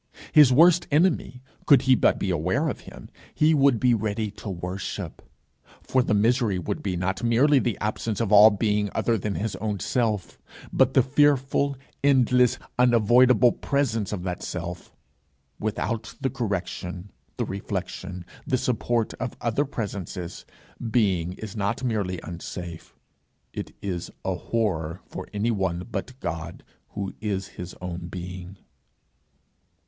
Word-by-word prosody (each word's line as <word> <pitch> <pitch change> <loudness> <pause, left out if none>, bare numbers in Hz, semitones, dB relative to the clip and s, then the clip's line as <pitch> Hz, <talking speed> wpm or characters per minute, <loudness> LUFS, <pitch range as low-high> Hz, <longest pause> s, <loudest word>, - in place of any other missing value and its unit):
His 150 -4 +7
worst 170 +5 +6
enemy, 150 -5 +1 0.2
could 140 -3 +6
he 130 - +5
but - - +3
be 95 - -1
aware 90 - 0
of - - -4
him, - - -12 0.3
he 155 +1 +4
would 140 -5 +4
be 125 +1 +4
ready 110 -1 -1
to 105 +1 -8
worship. 90 +1 -5 0.6
For 130 - +2
the 110 -3 +1
misery 115 -1 +2
would 100 +3 -3
be 95 -3 -2
not 95 +3 -2
merely 130 +5 +4
the 120 -4 -1
absence 110 0 -2
of 115 -3 -1
all 105 +1 +9
being 105 0 0
other 115 - +2
than 105 -1 -2
his 110 +1 -2
own 105 -2 -3
self, 110 -5 -1 0.3
but 130 0 +3
the 130 - +6
fearful, 140 0 +2 0.3
endless, 125 -3 +4 0.2
unavoidable 120 0 +5
presence 115 -8 -1
of 95 -4 -4
that 90 -2 -4
self. 90 0 -6 0.7
Without 110 +1 -3
the 135 - -1
correction, 95 -4 -4 0.3
the - - -1
reflection, 95 -2 -5 0.2
the 130 - +2
support 120 -2 0
of 125 -1 -4
other 120 +5 0
presences, 100 - -5 0.4
being 95 -7 +1
is 105 +1 -8
not 105 +4 -1
merely 100 -7 -1
unsafe, 85 -1 -8 0.6
it - - -6
is 90 -3 -3 0.2
a 95 - +1
horror 90 -4 -2
for - - -8
anyone 95 -5 -1
but 130 +3 -5
God, 85 +1 -5 0.3
who 100 -2 -4
is 100 -3 -2
his 90 +1 -8
own 85 -1 -5
being. 90 +1 -7
105 Hz, 140 wpm, -25 LUFS, 95-125 Hz, 0.7 s, all